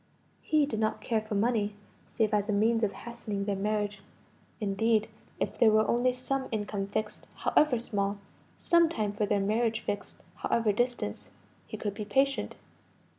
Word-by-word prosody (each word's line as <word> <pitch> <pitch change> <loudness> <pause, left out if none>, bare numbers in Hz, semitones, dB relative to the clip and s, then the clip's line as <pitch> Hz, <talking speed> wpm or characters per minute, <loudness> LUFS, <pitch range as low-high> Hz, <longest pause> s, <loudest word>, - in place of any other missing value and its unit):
He 305 -2 +3
did 225 -7 -3
not 215 0 0
care 225 -2 0
for 215 0 -5
money, 210 -1 +1 0.3
save 220 -1 0
as 205 0 +1
a - - +2
means 225 +3 +2
of 205 - +2
hastening 215 -4 -5
their 200 -1 0
marriage; 205 0 -1 0.6
indeed, 215 +1 +1 0.3
if - - -2
there 235 -3 +7
were 215 0 +4
only 245 +2 +3
some 260 +1 -2
income 205 -2 -2
fixed, 215 +1 -4
however 300 -5 +3
small 200 -3 -1 0.4
some 340 -1 +4
time 215 -9 -2
for 205 0 0
their 205 0 +2
marriage 220 +3 +1
fixed, 205 - -4 0.2
however 230 -2 +1
distant 240 +4 -2 0.4
he - - -6
could 205 -2 -3
be 210 - -5
patient. 270 +7 +1
215 Hz, 165 wpm, -29 LUFS, 205-235 Hz, 0.6 s, there